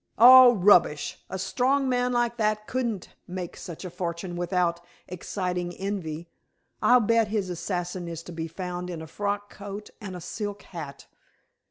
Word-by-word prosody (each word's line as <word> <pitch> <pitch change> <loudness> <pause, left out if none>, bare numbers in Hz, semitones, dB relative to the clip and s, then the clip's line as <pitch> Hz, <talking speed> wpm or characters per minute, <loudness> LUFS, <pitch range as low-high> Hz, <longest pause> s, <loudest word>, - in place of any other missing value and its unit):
"Oh, 250 +1 +10
rubbish. 180 -6 +3
A 190 - -4
strong 255 +8 +1
man 250 -1 +1
like 240 -1 0
that 215 -1 0
couldn't 235 -7 -2 0.2
make 180 -1 -5
such 170 +1 -8
a 180 - -6
fortune 175 0 -4
without 175 -1 0 0.3
exciting 180 -1 -3
envy. 175 -5 -4 0.5
I'll 250 0 +6
bet 230 0 +3
that - - -10
his 200 -4 -1
assassin 175 0 -3
is 165 -1 -6
to 175 - -10
be 165 -1 -4
found 180 +1 -5
in 165 -3 -5
a - - -7
frock 205 +5 -3
coat 205 0 -8
and 190 -3 -6
a - - -6
silk 205 +3 -5
hat. 155 -6 -8
185 Hz, 165 wpm, -26 LUFS, 175-215 Hz, 0.5 s, Oh